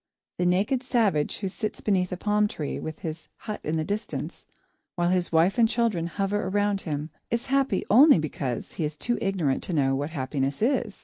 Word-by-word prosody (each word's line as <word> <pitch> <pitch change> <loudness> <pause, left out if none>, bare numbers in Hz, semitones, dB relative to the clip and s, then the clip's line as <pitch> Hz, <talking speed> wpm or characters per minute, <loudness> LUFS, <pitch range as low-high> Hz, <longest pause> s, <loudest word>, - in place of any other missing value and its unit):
The 180 - +2
naked 200 +8 +2
savage 220 - +1
who 195 - -3
sits 210 +3 -4
beneath 185 -3 +1
a 180 - -3
palm 210 +2 +2
tree, 150 -7 -4
with 160 0 -6
his 160 0 -6
hut 210 -1 -6
in 155 +2 -1
the 155 - 0
distance, 205 +6 -4 0.5
while 175 -1 +1
his 180 -1 +1
wife 170 +8 +3
and 225 -1 +5
children 225 -9 0
hover 195 +3 -1
around 205 0 +1
him, 150 -1 -4 0.2
is 235 +1 -1
happy 270 -8 +2
only 275 - +7
because 140 -5 -3
he - - -4
is 150 0 -3
too 240 +7 -1
ignorant 180 -9 0
to 180 - -4
know 135 -3 +2
what 145 +3 -2
happiness 135 +1 -2
is. 240 -4 0
185 Hz, 195 wpm, -26 LUFS, 155-210 Hz, 0.5 s, only